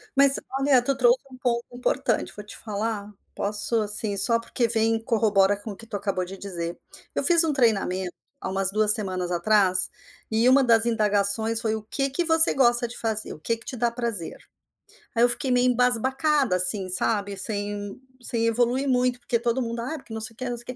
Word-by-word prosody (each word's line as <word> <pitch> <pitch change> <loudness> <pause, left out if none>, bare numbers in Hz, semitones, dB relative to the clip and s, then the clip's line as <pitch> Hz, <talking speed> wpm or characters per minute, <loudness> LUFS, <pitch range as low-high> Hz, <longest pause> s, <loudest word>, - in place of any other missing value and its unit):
Mas 275 0 +6 0.2
olha, 270 -2 +4
tu 275 +2 0
trouxe 250 -1 +3
um 255 - -12
ponto 240 -2 -1
importante. 245 +1 -1
Vou 210 - -8
te 210 - -9
falar, 210 -1 -4 0.2
posso, 210 +2 -1
assim, 210 0 -2
só 230 +4 +2
porque 235 +1 -1
vem 225 0 +2
e 225 - -5
corrobora 205 -3 +2
com 210 +2 -8
o - - -8
que 225 +4 -14
tu 215 -3 -4
acabou 195 -2 -2
de 190 +2 -9
dizer. 175 -3 -6 0.4
Eu - - 0
fiz 340 -1 +4
um 320 - 0
treinamento, 195 -8 0 0.3
há - - -6
umas 190 0 +1
2 215 +1 +2
semanas 185 -5 -2
atrás, 185 0 +2 0.4
e 225 +2 +2
uma 270 +2 +5
das 230 -2 +4
indagações 220 0 +1
foi: 220 -2 -1
"O 220 - -5
que 275 +5 -1
que 350 +6 -1
você 325 0 +5
gosta 240 -2 +2
de 235 - -10
fazer? 220 -1 -1
O - - -13
que 230 +8 -2
que 230 - -18
te - - -5
dá 240 0 0
prazer?". 235 -7 -3 0.8
Aí 230 - +3
eu 245 - +5
fiquei 260 +2 +1
meio 250 0 +3
embasbacada 255 - +1
assim, 185 +1 +1
sabe. 200 +1 -1
Sem 205 +1 -4 0.2
sem 230 -2 -1
evoluir 245 +4 0
muito, 250 -1 +1
porque 235 -1 -1
todo 235 +2 -1
mundo: 235 -1 -4
"Ah, 260 +7 -4
porque 240 -5 -12
não 220 - -4
sei 220 +1 -5
o - - -30
quê, 255 -1 -4
não 240 - -4
sei 235 - -7
o - - -29
225 Hz, 215 wpm, -24 LUFS, 205-245 Hz, 0.8 s, Mas